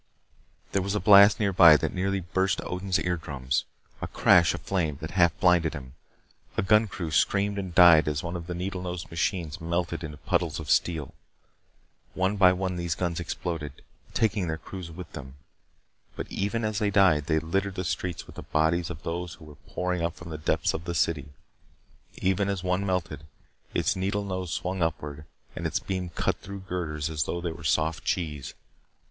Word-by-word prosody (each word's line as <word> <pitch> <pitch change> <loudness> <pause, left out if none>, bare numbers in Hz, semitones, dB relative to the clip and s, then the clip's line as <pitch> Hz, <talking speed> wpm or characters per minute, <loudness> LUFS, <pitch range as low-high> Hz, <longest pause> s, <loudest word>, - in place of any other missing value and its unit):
There 95 - +1
was 100 +2 -2
a - - +1
blast 100 +1 +7
nearby 90 -6 +7
that - - -2
nearly 95 +1 -1
burst 95 +3 0
Odin's 90 +1 -1
eardrums. 70 -9 -2 0.4
A - - -2
crash 85 -3 +4
of - - -8
flame 80 -7 -1
that 80 +1 -6
half 85 -3 +3
blinded 85 -3 +3
him. 65 -2 -9 0.6
A - - +2
gun 105 +2 +4
crew 85 -5 -5
screamed 100 +5 +2
and 95 -3 -6
died 85 -4 +8
as 75 +2 -1
one 85 +1 -4
of 85 -1 -6
the 90 - -4
needle 90 +1 -4
nosed 90 -3 -5
machines 85 -2 -2
melted 85 +1 -2
into 75 -1 -6
puddles - - -1
of 75 -3 -3
steel. 80 -5 +1 1.0
One 95 +2 +1
by 95 -2 +6
one 90 0 -2
these 85 -2 -2
guns 85 0 -2
exploded, 80 -4 -5 0.3
taking 105 -4 +1
their 80 0 -2
crews 90 +1 -8
with 85 +1 -9
them. 65 0 -9 0.8
But - - -6
even 105 +4 -1
as 110 -1 -1
they 105 -2 +1
died, 90 -7 +4
they 80 -1 +2
littered 95 +5 -1
the 90 - -2
streets 90 -1 -3
with - - -14
the - - -5
bodies 80 +3 +1
of 80 -2 -8
those 85 +1 -4
who 80 - -15
were 75 - -12
pouring 90 -1 -2
up 85 0 -1
from 85 -1 -10
the 80 - -4
depths 80 +3 +1
of 85 - -5
the 85 - -3
city. 75 -2 0 0.9
Even 95 +2 +1
as 95 -2 -2
one 90 +1 0
melted, 85 -6 -2 0.5
its - - +1
needle 100 +2 -1
nose 95 -3 -4
swung 95 0 -2
upward 75 -2 -3 0.3
and - - -2
its - - -1
beam 95 -2 -3
cut - - -1
through 100 +1 -8
girders 85 -5 -3
as 75 -2 -1
though 85 - -3
they 85 -1 -3
were 80 +1 -10
soft 80 +3 0
cheese. 75 -6 -3
85 Hz, 190 wpm, -27 LUFS, 80-95 Hz, 1.0 s, died